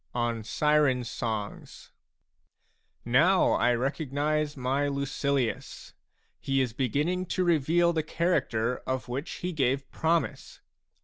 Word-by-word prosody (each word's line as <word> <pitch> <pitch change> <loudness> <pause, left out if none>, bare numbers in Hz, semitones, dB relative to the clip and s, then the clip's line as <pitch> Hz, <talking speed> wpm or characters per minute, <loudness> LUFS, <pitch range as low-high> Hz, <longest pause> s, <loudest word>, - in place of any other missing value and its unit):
ON 120 -2 -1
SIREN 150 0 +2
SONGS 110 -3 -5 1.1
Now 165 +11 +4
l 120 +1 +4
recognize 145 +2 -1
my 135 +3 0
Lucilius! 140 -2 -2 0.5
He 135 0 0
is 125 -4 0
beginning 150 +9 -1
to 185 - 0
reveal 170 +1 +3
the 160 - +1
character 125 -8 0
of 130 -1 -2
which 135 +6 -4 0.2
he 180 - -1
gave 135 -2 0
promise. 160 -4 -1
140 Hz, 110 wpm, -28 LUFS, 125-155 Hz, 1.1 s, Now